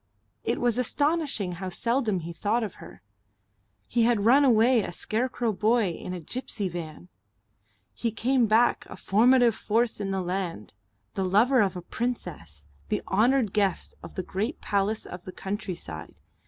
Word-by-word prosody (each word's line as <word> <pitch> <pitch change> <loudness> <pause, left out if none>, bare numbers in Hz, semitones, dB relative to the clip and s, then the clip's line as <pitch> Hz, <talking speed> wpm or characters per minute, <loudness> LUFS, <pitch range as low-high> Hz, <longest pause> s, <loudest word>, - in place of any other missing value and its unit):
It 235 - -1
was 240 0 +1
astonishing 285 - 0
how 185 +2 -5
seldom 230 -1 0
he 170 +1 -6
thought 210 +8 0
of 210 - -6
her.... - - -13 0.8
He 235 - +1
had 230 -3 +2
run 270 +5 +6
away 240 -1 +5
a 190 - -5
scarecrow 235 +3 -1
boy 220 +1 +2
in 175 - -7
a 180 - -4
gipsy 210 - -4
van. 170 0 -7 0.8
He 235 - -2
came 240 +2 +1
back 225 +3 +3
a - - -9
formative 240 +3 +4
force 225 +2 0
in 200 -1 -3
the 190 -1 -1
land, 180 - -4 0.4
the 195 - -1
lover 220 +7 +4
of 195 -3 +1
a 180 - -6
princess, 85 - -5 0.2
the - - -1
honoured 230 +1 +2
guest 200 -4 0
of - - -11
the 185 - -3
great 215 - -3
palace 205 +2 -1
of 180 0 -9
the 185 - -6
countryside. 180 - -6
215 Hz, 160 wpm, -27 LUFS, 185-240 Hz, 0.8 s, run